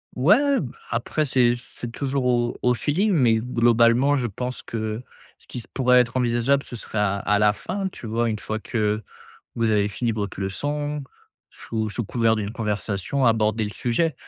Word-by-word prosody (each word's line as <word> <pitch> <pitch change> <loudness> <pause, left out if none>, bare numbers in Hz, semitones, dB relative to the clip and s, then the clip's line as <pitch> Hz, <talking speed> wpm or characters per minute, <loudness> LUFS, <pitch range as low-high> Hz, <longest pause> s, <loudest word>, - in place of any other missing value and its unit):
Ouais! 245 - +4
Bah, 125 -6 -6
après, 120 +6 -1
c'est 125 -3 +3
c'est 120 -1 -9
toujours 135 +1 -2
au 120 -1 +1
au 125 0 +4
feeling 185 - +1
mais, 125 -9 +4
globalement 120 +3 +3
je 130 -4 0
pense 125 +4 -5
que, 110 0 -4 0.4
ce - - -24
qui - - -6
s 115 - -10
pourrait 125 -1 +4
être 125 +1 +1
envisageable, 125 +3 +2
ce - - -9
serait 110 -1 -7
à 100 -1 +1
à 105 +1 +1
la 105 0 +4
fin, 195 - -4
tu 125 - -9
vois? 115 +2 0
Une 110 -1 -2
fois 110 +1 -4
que, 110 -1 -1 0.5
vous 115 -1 +1
avez 105 -1 +2
fini 115 +3 -1
votre 100 -3 -4
leçon, 145 +9 -2 0.5
sous 110 -1 -4
sous 115 +3 -3
couvert 115 +1 +1
d'une 105 0 -3
conversation, 105 +3 -2
aborder 110 -1 +2
le 105 - -5
sujet 140 +6 0
120 Hz, 185 wpm, -24 LUFS, 110-130 Hz, 0.5 s, Ouais